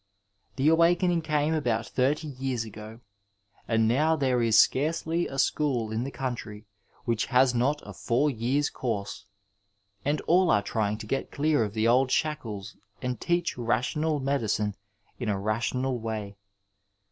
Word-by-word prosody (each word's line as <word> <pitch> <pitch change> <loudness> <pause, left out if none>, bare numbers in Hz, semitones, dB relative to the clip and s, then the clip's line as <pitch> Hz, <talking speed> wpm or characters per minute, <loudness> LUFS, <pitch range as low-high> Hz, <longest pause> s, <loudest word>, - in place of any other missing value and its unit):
The 135 +2 +1
awakening 170 +2 +4
came 150 0 0
about 120 -7 0
thirty 145 +5 0
years 130 -4 -3
ago, 110 +1 -10 0.7
and 115 -1 +2
now 150 +7 +3
there 130 -5 +1
is 115 -2 +3
scarcely 160 +4 +2
a 135 - -7
school 135 -5 +1
in 110 +2 -1
the 140 - -5
conntry 120 -6 -5 0.4
which 115 -2 0
has 125 0 +4
not 135 +5 0
a - - -8
four 125 +6 +1
years 130 +5 0
course, 110 -6 -4 0.8
and 145 +1 0
all 180 +1 +3
are 105 -1 +3
trying 105 -1 -1
to 110 - -8
get 135 +5 -2
dear 150 -3 +2
of 105 0 -5
the 110 +1 +2
old 130 +2 +4
shaddes 115 -10 -2 0.2
and 125 -1 -4
teach 175 -6 0
rational 145 +6 0
medicine 110 -7 0 0.5
in 120 -4 -2
a 100 -2 0
rational 120 +5 -1
way. 110 -3 -5
125 Hz, 150 wpm, -27 LUFS, 110-150 Hz, 0.8 s, awakening